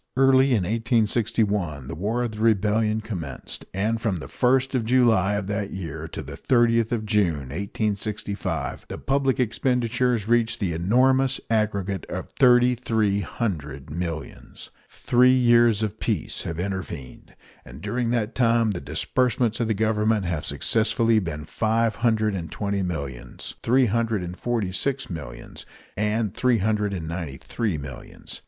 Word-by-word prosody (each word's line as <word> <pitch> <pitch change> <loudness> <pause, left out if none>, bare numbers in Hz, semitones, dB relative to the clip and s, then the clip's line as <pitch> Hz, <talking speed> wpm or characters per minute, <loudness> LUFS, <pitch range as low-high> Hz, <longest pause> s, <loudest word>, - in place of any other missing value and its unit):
Early 135 0 +5
in 100 - +1
1861 105 - 0
the - - -5
War 110 +8 -1
of 120 - -2
the 105 - -9
Rebellion 110 0 +2
commenced; 85 - -6
and 110 +4 -1
from 105 -4 0
the 80 - -7
1st 130 +1 +1
of 125 -3 +1
July 110 -5 +3
of 100 -1 -2
that 100 0 -2
year 95 -4 -5
to - - -7
the - - -8
30th 115 -2 +2
of 115 -3 -1
June, 85 - +1
1865, 100 +2 -3
the - - -6
public 135 -1 0
expenditures 125 -1 +1
reached 115 -1 +2
the 95 -6 -1
enormous 130 +9 +2
aggregate 100 -4 0
of - - -6
thirty 125 -1 +5
three 110 -4 0
hundred 75 - -4
millions. 85 -1 -6 0.2
Three 125 +1 +3
years 120 -3 +4
of 110 0 -3
peace 105 -9 -2
have 85 0 -4
intervened, 90 -8 -6 0.3
and 65 +3 -12
during 120 +7 -2
that 115 -1 0
time 115 -2 +3
the 90 - -4
disbursements 125 -3 0
of 115 - 0
the 110 - 0
Government 110 -1 +1
have 85 -3 -2
successively 115 0 +2
been 80 -6 -5
five 110 +6 0
hundred 110 -3 +1
and 85 -5 -5
twenty 100 -1 -2
millions, 70 -9 -5
three 130 +2 +3
hundred 115 -3 0
and 90 +1 -6
forty 115 -4 -2
six 135 +4 -2
millions, 70 -8 -8 0.3
and 105 0 0
three 125 0 +2
hundred 105 0 0
and 85 -5 -4
ninety 80 -5 -5
three 105 - -2
millions. 70 -3 -9
110 Hz, 150 wpm, -24 LUFS, 95-120 Hz, 0.3 s, Early